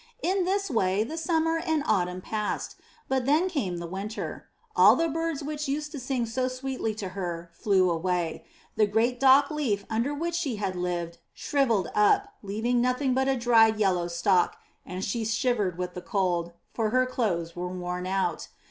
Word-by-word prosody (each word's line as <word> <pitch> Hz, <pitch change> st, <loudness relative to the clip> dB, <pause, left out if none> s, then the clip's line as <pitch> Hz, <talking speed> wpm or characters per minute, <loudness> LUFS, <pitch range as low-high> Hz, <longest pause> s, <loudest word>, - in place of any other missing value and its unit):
In 375 Hz, 0 st, +1 dB
this 395 Hz, -1 st, 0 dB
way 195 Hz, -3 st, +2 dB
the 300 Hz, +8 st, -6 dB
summer 325 Hz, 0 st, +1 dB
and 320 Hz, -3 st, 0 dB
autumn 180 Hz, -3 st, 0 dB
passed, 210 Hz, +2 st, -3 dB, 0.3 s
but 260 Hz, -1 st, 0 dB
then 310 Hz, +6 st, +4 dB
came 220 Hz, -, -2 dB
the 170 Hz, -, -5 dB
winter. 195 Hz, +6 st, -5 dB, 0.3 s
All -, -, +7 dB
the 330 Hz, -, +1 dB
birds 325 Hz, -1 st, -2 dB
which 300 Hz, 0 st, -4 dB
used 295 Hz, +2 st, -2 dB
to 295 Hz, -, -6 dB
sing 255 Hz, -1 st, -1 dB
so 255 Hz, +3 st, -1 dB
sweetly 255 Hz, -4 st, -3 dB
to 200 Hz, -3 st, -5 dB
her 175 Hz, -3 st, -5 dB
flew 190 Hz, -1 st, +2 dB
away; 170 Hz, 0 st, -1 dB, 0.3 s
the 215 Hz, -, +3 dB
great 230 Hz, +4 st, +1 dB
dock 275 Hz, +2 st, +6 dB
leaf 230 Hz, -10 st, -1 dB
under 230 Hz, +6 st, 0 dB
which 335 Hz, +4 st, -2 dB
she 285 Hz, -8 st, -1 dB
had 195 Hz, -3 st, -3 dB
lived 175 Hz, -1 st, -3 dB, 0.2 s
shrivelled 235 Hz, -, +1 dB
up 210 Hz, -1 st, +3 dB
leaving 220 Hz, +5 st, 0 dB
nothing 250 Hz, +2 st, +1 dB
but 265 Hz, +1 st, +1 dB
a 270 Hz, -1 st, +2 dB
dried 225 Hz, -2 st, +5 dB
yellow 185 Hz, -5 st, +1 dB
stalk, 175 Hz, +1 st, +2 dB, 0.3 s
and 185 Hz, +2 st, -4 dB
she 225 Hz, +3 st, -2 dB
shivered 215 Hz, -5 st, 0 dB
with 180 Hz, 0 st, -4 dB
the 180 Hz, -, -6 dB
cold, 175 Hz, -3 st, -1 dB, 0.2 s
for 225 Hz, -2 st, 0 dB
her 255 Hz, +3 st, +3 dB
clothes 180 Hz, -10 st, -2 dB
were 180 Hz, 0 st, -3 dB
worn 180 Hz, 0 st, -4 dB
out. 185 Hz, -3 st, -1 dB
220 Hz, 180 wpm, -27 LUFS, 185-270 Hz, 0.3 s, All